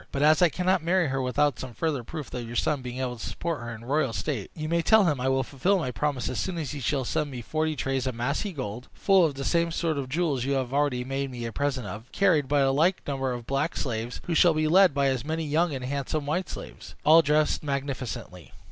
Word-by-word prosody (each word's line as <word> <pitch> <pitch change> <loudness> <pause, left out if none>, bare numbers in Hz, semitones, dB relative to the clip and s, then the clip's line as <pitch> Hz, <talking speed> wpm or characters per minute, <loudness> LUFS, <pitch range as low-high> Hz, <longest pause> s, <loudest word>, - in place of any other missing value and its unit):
But 140 - -1
as 155 +2 +5
I 175 - +6
cannot 180 +2 +1
marry 175 -2 +2
her 135 0 -1
without 135 +1 +1
some 130 -3 -7
further 145 0 -1
proof 150 +3 -7
of 120 -2 -4
your 120 - -7
son 145 +2 +1
being 125 0 -6
able 125 -2 -2
to - - -8
support 165 -4 -3
her 120 0 -6
in 115 0 -8
royal 135 -2 +1
state, 125 -9 -3
you 155 -1 -4
may 170 +1 +1
tell 220 +5 +5
him 150 -8 +1
I 130 - +1
will 135 0 +2
fulfil 145 +10 +1
my 155 -8 -2
promise 135 +2 -1
as 125 - -2
soon 185 -2 -2
as 150 -6 -3
he 145 - -5
shall 135 +1 -1
send 150 +4 -1
me 125 -3 -7
forty 155 +4 -1
trays 135 -1 -1
of 130 - -2
massy 140 - -1
gold, 125 - -6
full 195 -2 +4
of 155 -4 +1
the 135 0 -5
same 170 -1 +2
sort 160 -3 -1
of 130 -2 -5
jewels 145 -4 0
you 140 +2 0
have 130 -2 -1
already 140 -3 +1
made 135 +1 -3
me 120 -2 -6
a 115 - -4
present 135 -2 -1
of, 105 +3 -6
and 120 - -26
carried 170 -8 +3
by 145 +1 +2
the 135 0 +3
like 170 +7 +2
number 135 -2 -1
of 120 -2 -5
black 140 +6 -1
slaves, 120 -2 -3
who 175 - -2
shall 165 0 +5
be 155 0 +1
led 185 -2 +5
by 140 -1 +2
as 130 -3 +1
many 160 +2 -2
young 160 +3 +1
and 130 -3 -4
handsome 140 +2 -2
white 170 +6 -1
slaves, - - -9
all 160 +2 +8
dressed 150 0 +2
magnificently. 130 - -4
140 Hz, 260 wpm, -27 LUFS, 125-155 Hz, -, all